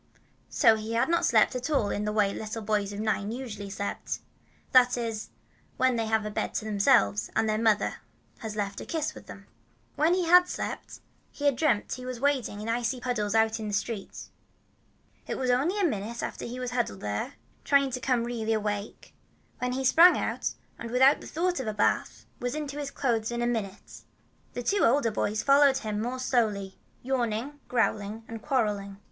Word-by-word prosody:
So 220 Hz, -, +5 dB
he 220 Hz, +1 st, -5 dB
had 235 Hz, +5 st, +1 dB
not 340 Hz, 0 st, +2 dB
slept 225 Hz, +1 st, +4 dB
at 250 Hz, +4 st, -3 dB
all 245 Hz, -9 st, +1 dB
in 205 Hz, -, -2 dB
the 210 Hz, -, -1 dB
way 205 Hz, -2 st, +2 dB
little 220 Hz, +1 st, -5 dB
boys 205 Hz, -1 st, 0 dB
of 205 Hz, -, -6 dB
nine 210 Hz, -1 st, -1 dB
usually 225 Hz, -5 st, -6 dB
sleep, 200 Hz, +1 st, -3 dB, 0.7 s
that 250 Hz, -1 st, +5 dB
is, 225 Hz, -2 st, -4 dB, 0.5 s
when 255 Hz, -1 st, +3 dB
they 225 Hz, -1 st, -1 dB
have 220 Hz, -1 st, +1 dB
a 210 Hz, -, -4 dB
bed -, -, -3 dB
to 215 Hz, -, -2 dB
themselves, 210 Hz, 0 st, +3 dB
and 220 Hz, -, +2 dB
their 215 Hz, 0 st, +1 dB
mother 220 Hz, -2 st, +2 dB, 0.4 s
has 220 Hz, -2 st, -6 dB
left 200 Hz, -1 st, -3 dB
a -, -, -7 dB
kiss 310 Hz, -1 st, -2 dB
with -, -, -13 dB
them. 200 Hz, -, -11 dB, 0.5 s
When 320 Hz, +4 st, +3 dB
he 365 Hz, -1 st, 0 dB
had 360 Hz, +2 st, +7 dB
slept, -, -, -5 dB, 0.3 s
he 290 Hz, -, -6 dB
had 285 Hz, -2 st, +4 dB
dreamed 245 Hz, -8 st, +1 dB
he 255 Hz, -, -7 dB
was 255 Hz, -2 st, -5 dB
wading 260 Hz, -6 st, 0 dB
in 215 Hz, -, -6 dB
icy 240 Hz, +2 st, -1 dB
puddles 225 Hz, -4 st, -1 dB
out 225 Hz, 0 st, +3 dB
in 215 Hz, -, -4 dB
the 205 Hz, -, -1 dB
street. 205 Hz, -1 st, -4 dB, 1.1 s
But -, -, -2 dB
it -, -, -4 dB
was 255 Hz, -1 st, +1 dB
only 305 Hz, +12 st, +1 dB
a -, -, +1 dB
minute 230 Hz, -, -1 dB
that -, -, -4 dB
he 235 Hz, -, -5 dB
huddled 245 Hz, -, -2 dB
there, 105 Hz, 0 st, -3 dB, 0.3 s
trying 280 Hz, -1 st, +3 dB
to 250 Hz, -, -3 dB
come 250 Hz, -2 st, +1 dB
really 230 Hz, -2 st, -2 dB
awake, 210 Hz, -1 st, -4 dB, 0.5 s
and 250 Hz, 0 st, -1 dB
then 255 Hz, -, -2 dB
he 265 Hz, -, -2 dB
sprang 335 Hz, +7 st, +7 dB
out, -, -, -2 dB, 0.2 s
and 235 Hz, -, -6 dB
without 265 Hz, +4 st, +4 dB
thought 355 Hz, +1 st, -1 dB
of 260 Hz, -, -4 dB
a 215 Hz, -, -2 dB
bath, 210 Hz, -, 0 dB
was 245 Hz, +2 st, -3 dB
into 295 Hz, -1 st, -4 dB
his 285 Hz, -1 st, -3 dB
clothes 230 Hz, -6 st, -1 dB
in 240 Hz, 0 st, -2 dB
a -, -, +1 dB
minute. 220 Hz, -5 st, -4 dB, 0.5 s
The 245 Hz, -, -4 dB
two 400 Hz, +10 st, +1 dB
older 235 Hz, -1 st, +3 dB
boys 215 Hz, 0 st, -1 dB
followed 275 Hz, -1 st, +5 dB
him 215 Hz, -5 st, -3 dB
more 245 Hz, +3 st, -3 dB
slowly, 215 Hz, -7 st, -1 dB, 0.2 s
yawning, 250 Hz, +2 st, -2 dB
growling, 220 Hz, -2 st, -1 dB
and 225 Hz, -1 st, -7 dB
quarreling. 210 Hz, -7 st, -1 dB
230 Hz, 200 wpm, -28 LUFS, 210-260 Hz, 1.1 s, had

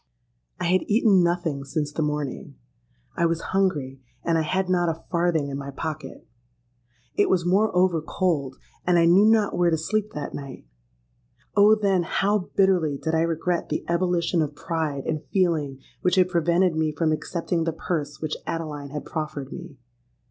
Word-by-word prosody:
"I -, -, -3 dB
had 180 Hz, +2 st, +3 dB
eaten 210 Hz, -3 st, +4 dB
nothing 170 Hz, -5 st, -1 dB
since 145 Hz, +1 st, -3 dB
the 155 Hz, -, -3 dB
morning: 150 Hz, -, -3 dB, 0.6 s
I 170 Hz, -, +2 dB
was 165 Hz, 0 st, -1 dB
hungry, 150 Hz, -9 st, 0 dB, 0.2 s
and 165 Hz, -, +1 dB
I 160 Hz, -, +3 dB
had 185 Hz, +4 st, 0 dB
not 175 Hz, -2 st, +2 dB
a 165 Hz, 0 st, -5 dB
farthing 170 Hz, -4 st, +1 dB
in 135 Hz, 0 st, -4 dB
my 140 Hz, 0 st, -6 dB
pocket. 145 Hz, 0 st, -6 dB, 0.9 s
It -, -, +2 dB
was 175 Hz, -2 st, +2 dB
moreover 180 Hz, -3 st, +3 dB
cold; 150 Hz, -5 st, -1 dB, 0.3 s
and 180 Hz, -1 st, +3 dB
I 170 Hz, -, +5 dB
knew 180 Hz, +5 st, +6 dB
not 220 Hz, -2 st, +3 dB
where 175 Hz, -1 st, +3 dB
to 160 Hz, -, +1 dB
sleep 215 Hz, +6 st, -2 dB
that 150 Hz, -1 st, -5 dB
night. 140 Hz, -, -8 dB, 0.9 s
Oh! 210 Hz, +1 st, +7 dB
then 200 Hz, -4 st, +2 dB
how 195 Hz, +3 st, 0 dB
bitterly 180 Hz, -7 st, +3 dB
did 160 Hz, +3 st, -3 dB
I 160 Hz, -, +3 dB
regret 165 Hz, +1 st, -1 dB
the -, -, -2 dB
ebullition 170 Hz, 0 st, +1 dB
of 150 Hz, -1 st, -2 dB
pride 150 Hz, -3 st, -3 dB
and 155 Hz, -1 st, -2 dB
feeling 155 Hz, -5 st, 0 dB, 0.2 s
which 180 Hz, -, +2 dB
had 185 Hz, -1 st, +4 dB
prevented 175 Hz, 0 st, +2 dB
me 160 Hz, -1 st, +1 dB
from 155 Hz, +1 st, 0 dB
accepting 165 Hz, +1 st, -2 dB
the 165 Hz, -, 0 dB
purse 150 Hz, -3 st, -3 dB
which 155 Hz, -1 st, -3 dB
Adeline 150 Hz, -4 st, -4 dB
had 150 Hz, +1 st, -6 dB
proffered 150 Hz, -3 st, -5 dB
me! 170 Hz, -5 st, -9 dB
165 Hz, 170 wpm, -24 LUFS, 150-180 Hz, 0.9 s, Oh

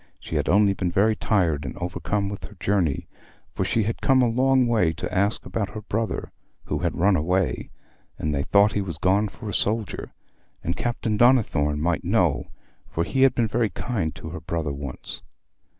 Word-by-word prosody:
She -, -, -7 dB
had -, -, 0 dB
only 100 Hz, +2 st, +5 dB
been 90 Hz, -2 st, -2 dB
very 105 Hz, +5 st, +3 dB
tired 85 Hz, -10 st, +1 dB
and 65 Hz, -, -6 dB
overcome 100 Hz, +3 st, -2 dB
with 100 Hz, 0 st, -6 dB
her -, -, -12 dB
journey, 90 Hz, -8 st, 0 dB, 0.5 s
for -, -, -1 dB
she 115 Hz, -, +1 dB
had 115 Hz, +3 st, -3 dB
come 130 Hz, -2 st, +4 dB
a -, -, +4 dB
long 130 Hz, +2 st, +3 dB
way 105 Hz, -9 st, +2 dB
to 90 Hz, +2 st, -5 dB
ask 100 Hz, +3 st, +1 dB
about 100 Hz, -3 st, -2 dB
her 110 Hz, -, -4 dB
brother, 110 Hz, +1 st, -3 dB, 0.3 s
who -, -, -2 dB
had -, -, -1 dB
run 95 Hz, +2 st, +4 dB
away, 90 Hz, +3 st, 0 dB, 0.5 s
and 75 Hz, 0 st, -1 dB
they 70 Hz, -, 0 dB
thought 100 Hz, +7 st, +4 dB
he 105 Hz, -, 0 dB
was 85 Hz, -6 st, -5 dB
gone 100 Hz, +5 st, +2 dB
for 110 Hz, +2 st, -9 dB
a 105 Hz, -, -3 dB
soldier, 110 Hz, +1 st, -1 dB, 0.5 s
and 85 Hz, -, -1 dB
Captain 115 Hz, -3 st, -1 dB
Donnithorne 90 Hz, -, +3 dB
might 85 Hz, +1 st, 0 dB
know, -, -, +1 dB, 0.4 s
for 85 Hz, -, -1 dB
he 100 Hz, +10 st, -1 dB
had 135 Hz, -1 st, +5 dB
been 115 Hz, -2 st, +2 dB
very 110 Hz, 0 st, +1 dB
kind 100 Hz, -11 st, -3 dB
to -, -, -8 dB
her -, -, -6 dB
brother 80 Hz, -4 st, -2 dB
once. 70 Hz, -2 st, -7 dB
100 Hz, 195 wpm, -24 LUFS, 85-110 Hz, 0.5 s, only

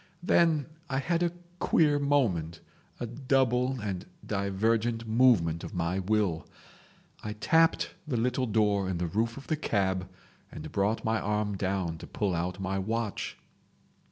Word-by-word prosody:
Then 165 Hz, -5 st, +3 dB, 0.2 s
I 135 Hz, -, 0 dB
had 165 Hz, +5 st, 0 dB
a 175 Hz, -1 st, +2 dB, 0.3 s
queer 150 Hz, -3 st, +3 dB
moment, 100 Hz, -, +1 dB, 0.4 s
a -, -, -2 dB
double 130 Hz, 0 st, +1 dB
and 100 Hz, -4 st, -4 dB, 0.2 s
divergent 110 Hz, +3 st, 0 dB
movement 110 Hz, -9 st, +3 dB
of -, -, -7 dB
my 90 Hz, +2 st, 0 dB
will: 95 Hz, -5 st, 0 dB, 0.8 s
I 105 Hz, -, -3 dB
tapped 160 Hz, +9 st, +3 dB, 0.2 s
the 130 Hz, -5 st, -1 dB
little 125 Hz, +2 st, 0 dB
door 105 Hz, -3 st, +2 dB
in 90 Hz, -, -1 dB
the 90 Hz, -, -1 dB
roof 110 Hz, -, -1 dB
of 140 Hz, -, -9 dB
the 155 Hz, -, 0 dB
cab, 95 Hz, -8 st, 0 dB, 0.4 s
and -, -, -8 dB
brought 100 Hz, +3 st, 0 dB
my 110 Hz, 0 st, +1 dB
arm 105 Hz, -1 st, -1 dB
down 95 Hz, -4 st, -2 dB
to -, -, -9 dB
pull 100 Hz, -3 st, -1 dB
out 90 Hz, +3 st, -2 dB
my 95 Hz, 0 st, -1 dB
watch. 110 Hz, +2 st, -3 dB
105 Hz, 150 wpm, -29 LUFS, 95-125 Hz, 0.8 s, Then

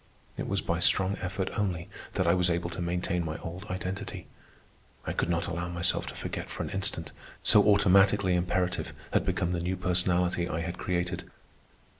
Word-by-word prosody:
It -, -, -4 dB
was -, -, 0 dB
by 85 Hz, 0 st, -1 dB
strong 95 Hz, +3 st, +3 dB
effort 95 Hz, +1 st, -2 dB
only 90 Hz, -5 st, -1 dB, 0.3 s
that 95 Hz, -, +1 dB
I 85 Hz, -, +5 dB
was 90 Hz, -1 st, +3 dB
able 85 Hz, +1 st, -1 dB
to 90 Hz, -, -5 dB
maintain 90 Hz, +1 st, -1 dB
my 80 Hz, -1 st, -3 dB
old 90 Hz, +4 st, -7 dB
identity; 95 Hz, 0 st, -5 dB, 0.8 s
I -, -, -2 dB
could -, -, -1 dB
not 85 Hz, 0 st, +1 dB
allow 85 Hz, +1 st, -3 dB
myself 85 Hz, 0 st, 0 dB
to -, -, -6 dB
forget -, -, -5 dB
for -, -, -4 dB
an -, -, -5 dB
instant, 95 Hz, -6 st, -1 dB, 0.3 s
so 105 Hz, -, +7 dB
automatically 100 Hz, -1 st, +5 dB
imperative 90 Hz, +1 st, 0 dB, 0.2 s
had -, -, +3 dB
become 85 Hz, -, 0 dB
the 85 Hz, -, 0 dB
new 90 Hz, +2 st, -1 dB
personality 90 Hz, -1 st, +1 dB
I 80 Hz, -, -2 dB
had 85 Hz, +1 st, -4 dB
created. 90 Hz, -1 st, -2 dB
90 Hz, 180 wpm, -29 LUFS, 85-95 Hz, 0.8 s, so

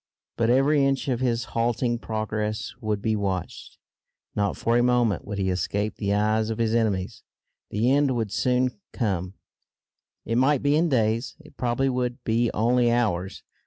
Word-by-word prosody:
But 115 Hz, 0 st, +1 dB
every 140 Hz, +3 st, +4 dB
inch 135 Hz, 0 st, 0 dB
of 125 Hz, -2 st, 0 dB
his 120 Hz, -2 st, 0 dB
halting 120 Hz, +1 st, 0 dB
progress 110 Hz, 0 st, -3 dB
would 105 Hz, -2 st, -2 dB
be 110 Hz, -1 st, +1 dB
watched. 95 Hz, -4 st, -4 dB, 0.6 s
Not 100 Hz, -1 st, 0 dB
for 115 Hz, -, +1 dB
a 120 Hz, -, +4 dB
moment 120 Hz, -3 st, +2 dB
would 105 Hz, -1 st, -5 dB
he 95 Hz, -1 st, 0 dB
escape 100 Hz, +4 st, -2 dB
the 100 Hz, -2 st, -1 dB
eyes 110 Hz, +1 st, +1 dB
of 110 Hz, -, -3 dB
his 115 Hz, -1 st, 0 dB
enemies. 105 Hz, -5 st, 0 dB, 0.5 s
The 115 Hz, +5 st, +1 dB
end 140 Hz, -2 st, +3 dB
would 110 Hz, -4 st, -2 dB
soon 125 Hz, -, 0 dB
come; 95 Hz, -6 st, -2 dB, 0.9 s
it 115 Hz, +1 st, +1 dB
might 135 Hz, +1 st, +3 dB
be 145 Hz, +1 st, +3 dB
in 165 Hz, +2 st, +2 dB
days; 115 Hz, -2 st, 0 dB
it 155 Hz, -, -18 dB
probably 125 Hz, +2 st, 0 dB
would 125 Hz, -1 st, -2 dB
be 115 Hz, +1 st, +1 dB
only 120 Hz, +2 st, +2 dB
hours. 95 Hz, -6 st, -1 dB
115 Hz, 165 wpm, -25 LUFS, 105-125 Hz, 0.9 s, every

